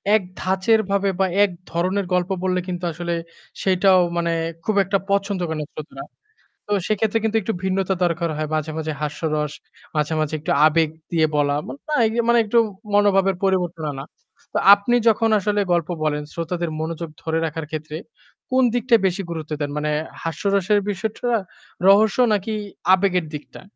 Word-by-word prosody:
এক 215 - +3 0.2
ধাঁচের 190 +4 +2
ভাবে 200 0 +2
বা 190 - +3 0.2
এক 205 - +2 0.2
ধরনের 185 +3 0
গল্প 180 +1 +1
বললে 185 -1 +1
কিন্তু 180 -1 -4
আসলে 170 +1 -3 0.5
সেইটাও 185 0 +4 0.2
মানে 170 0 0 0.3
খুব 215 - 0
একটা 195 +2 +1
পছন্দ 200 -1 0
করে 160 - -2
না - - -4
শ্রোতারা। 140 -3 -8 0.6
তো - - -7 0.2
সেক্ষেত্রে 215 +1 +1
কিন্তু 220 0 +1
একটু 220 +4 -2
ভিন্নতা 190 0 0
দরকার 170 -1 0
হয়। 155 0 -2
মাঝে, 155 0 -2
মাঝে 155 0 -3
হাস্যরস, 150 0 -2 0.4
মাঝে, 150 +1 0
মাঝে 155 0 -1
একটু 150 - -3 0.2
আবেগ 160 0 +2 0.2
দিয়ে 160 -2 +3
বলা। 145 -1 +2
না 300 +2 -5 0.3
মানে 235 0 +5
একটু 225 +3 +1 0.4
মনোভাবের 195 -2 +4
পরিবর্তন 180 -4 0
আনা। 135 0 -7 0.5
তো - - 0 0.2
আপনি 205 +4 0
যখন 225 +1 +2
আসলে 205 +1 0
গল্প 170 -1 0
বলেন 150 -1 0
শ্রোতাদের 170 0 -3
মনোযোগ 165 +1 -4
ধরে 160 0 0
রাখার 160 0 -4
ক্ষেত্রে 155 0 -5 0.5
কোন 260 0 +4
দিকটায় 240 -2 +3
বেশি 190 +2 -2
গুরুত্ব 160 -2 -6
দেন? 145 - -1
মানে 150 0 -1 0.3
হাস্যরসের 195 +5 +1
বিষয়টা? 215 +5 -3 0.6
রহস্য 210 +3 +5
নাকি 210 +2 -1 0.4
আবেগের 185 -2 +2
দিকটা? 150 - -10
180 Hz, 160 wpm, -22 LUFS, 160-200 Hz, 0.6 s, মানে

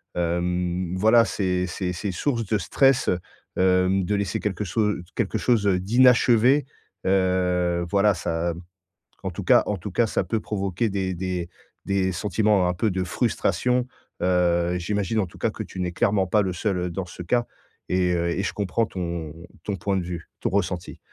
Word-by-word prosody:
hem, 90 +1 -1
voilà, 110 +4 +5
c'est 90 -4 -1
c'est 90 0 -3
c'est 95 +3 -3
source 115 +5 -1
de 105 +2 +1
stress, 135 +6 +2
heu, 90 - +1 0.7
hem, 95 +1 +1
de 105 +3 0
laisser 100 -2 -1
quelque 105 0 -2
chose 105 +2 0 0.2
quelque - - -1
chose, 115 -4 +2
heu, 95 -2 +3
d'inachevé. 125 +5 +4 0.4
Heu 90 -2 +1
voilà, 100 +2 +3
ça 85 -1 -2 0.7
en - - -2
tout - - -6
cas - - +6
en 105 - -1
tout 95 +3 -7
cas, 115 +6 +2
ça - - -1
peut 110 -2 -1
provoquer 100 +1 -1
des 95 -2 -2
des 90 -1 -3 0.4
des 95 -1 +1
sentiments 100 +1 +1
un 90 - +1
peu 105 +4 0
de 95 0 -1
frustration. 125 +5 0 0.3
Heu, 90 -1 +2
j'imagine, 105 +4 -1
en 100 - +1
tout - - -15
cas, - - 0
que - - -6
tu - - -9
n'es 90 -1 -2
clairement 100 -1 +1
pas 105 +3 +3
le 95 -2 -1
seul 90 -1 -1
dans 90 +2 -4
ce 90 0 -9
cas, 120 +7 +1 0.4
et 90 -1 +1
heu, 85 0 0
et 90 +3 -1
je 90 - -1
comprends 105 +3 0
ton 85 -5 -5 0.3
ton 100 - -2
point 95 +3 -1
de 90 - -1
vue, 85 -1 -7
ton - - 0
ressenti. 90 -2 -2
95 Hz, 185 wpm, -24 LUFS, 90-105 Hz, 0.7 s, cas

